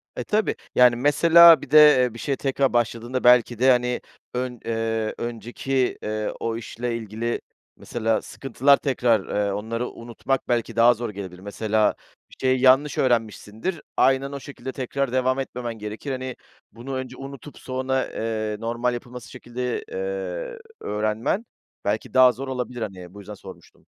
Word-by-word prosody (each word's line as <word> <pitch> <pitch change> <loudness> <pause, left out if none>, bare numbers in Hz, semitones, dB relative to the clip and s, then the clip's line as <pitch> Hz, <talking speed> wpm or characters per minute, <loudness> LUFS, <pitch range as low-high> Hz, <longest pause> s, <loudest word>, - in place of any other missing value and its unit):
E, - - -3
tabii. 215 0 0 0.2
Yani, 125 -1 +6
mesela 165 +4 +7
bir 135 - -10
de, 155 - +7 0.3
eee, 125 -3 -1
bir 115 - -10
şeye 140 -2 -1
tekrar 135 -1 0
başladığında 120 +2 -1
belki 120 -1 +5
de, 130 +1 +5
hani, 125 0 +1 0.3
ön 125 -1 -3
eee, 115 -1 -2
önceki, 120 +3 -2
eee, 110 0 -2
o 115 0 -2
işle 120 +1 -4
ilgili 115 +2 -4 0.4
mesela 115 -2 -1
sıkıntılar 135 +2 +2
tekrar, 120 -7 +1 0.2
eee, - - -1
onları 115 +4 -3
unutmak 120 +3 -4
belki 115 -2 -1
daha 115 +1 +6
zor 120 0 -5
gelebilir. 95 -3 -8
Mesela 105 +1 0 0.3
bir - - -16
şeyi 130 -1 +2
yanlış 135 +2 +4
öğrenmişsindir. 115 - -1 0.2
Aynen 135 +1 +3
o 140 - -5
şekilde 130 -1 -8
tekrar 135 0 -3
devam 130 +1 +1
etmemen 125 -3 -4
gerekir. 105 +6 -6
Hani, 130 -1 -4 0.4
bunu 120 +5 -8
önce 130 0 -6
unutup 140 +1 -10
sonra, 130 0 -1
eee, 110 -1 -3
normal 120 +2 -1
yapılması 120 0 -8
şekilde, 125 - -4
eee, - - -4 0.2
öğrenmen 110 - -1 0.4
belki 105 +2 -2
daha 130 -1 +7
zor 135 +3 -7
olabilir. 125 -2 -4
Hani, 90 -4 -7
bu 100 - -11
yüzden 105 +2 -9
sormuştum. - - -14
125 Hz, 155 wpm, -24 LUFS, 115-135 Hz, 0.4 s, mesela